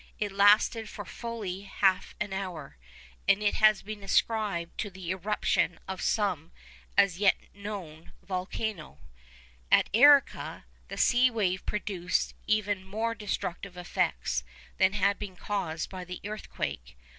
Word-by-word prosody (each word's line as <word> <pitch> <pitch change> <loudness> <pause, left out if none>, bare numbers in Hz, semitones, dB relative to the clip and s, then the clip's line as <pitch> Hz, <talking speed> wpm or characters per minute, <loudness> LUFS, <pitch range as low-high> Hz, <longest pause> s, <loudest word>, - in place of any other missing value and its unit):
It 210 -1 -2
lasted 210 +2 +4
for 205 - -7
fully 215 -6 -5
half 195 -1 +1
an 205 -2 -3
hour, 180 - -5 0.5
and 205 +2 +4
has 215 0 +4
been 210 0 -7
ascribed 195 -4 0
to 210 - -2
the 185 -2 -6
eruption 190 -2 0
of 190 -1 -5
some 185 -7 0 0.5
as 185 -3 +4
yet 200 -2 +5 0.2
unknown 195 -6 -8
volcano. 185 -1 -4 0.7
At - - +5
Arica 285 +3 +5 0.2
the - - -7
sea 250 +1 +5
wave 195 -6 0
produced 195 -4 -1
even 205 -2 +1
more 220 +4 -2
destructive 200 -3 -4
effects 175 - -1 0.4
than 190 0 +4
had 200 0 +2
been 200 -3 -6
caused 175 -5 -3
by 185 -1 -6
the 180 0 -7
earthquake. 65 - -5
200 Hz, 130 wpm, -29 LUFS, 180-210 Hz, 0.7 s, yet